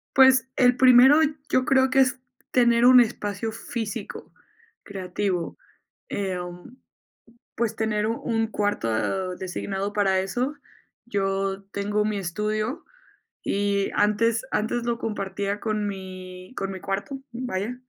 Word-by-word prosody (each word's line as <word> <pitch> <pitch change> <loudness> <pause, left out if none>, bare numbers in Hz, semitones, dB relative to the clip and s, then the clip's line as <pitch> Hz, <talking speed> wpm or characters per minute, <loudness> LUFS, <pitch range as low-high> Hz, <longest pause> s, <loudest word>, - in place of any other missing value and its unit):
Pues, 260 -2 +6
el 250 -1 +4
primero 260 +3 +7 0.3
yo 255 +1 +2
creo 265 -1 +4
que 270 - +2
es 260 0 +3 0.3
tener 240 -1 +4
un 255 0 +9
espacio 220 -2 -1
físico, 225 -1 -6 0.5
creativo, 185 -2 -3 0.5
em, 180 +4 -5 0.8
pues 230 -1 -1
tener 215 -1 0
u 230 +1 -2
un 225 -1 0
cuarto 190 - -1
designado 195 +2 -4
para 195 -2 +2
eso. 245 +9 -1 0.5
Yo 195 -2 -1
tengo 205 +1 0
mi 215 -1 -1
estudio, 215 - -2 0.6
y 200 0 0
antes 225 +3 +2
antes 235 +2 -1
lo 235 -1 0
compartía 200 -2 -3
con 215 -2 -1
mi 185 0 -8
con 195 0 -2
mi 190 - -6
cuarto, 200 +9 -4
vaya, 240 -1 -3
210 Hz, 120 wpm, -25 LUFS, 195-240 Hz, 0.8 s, un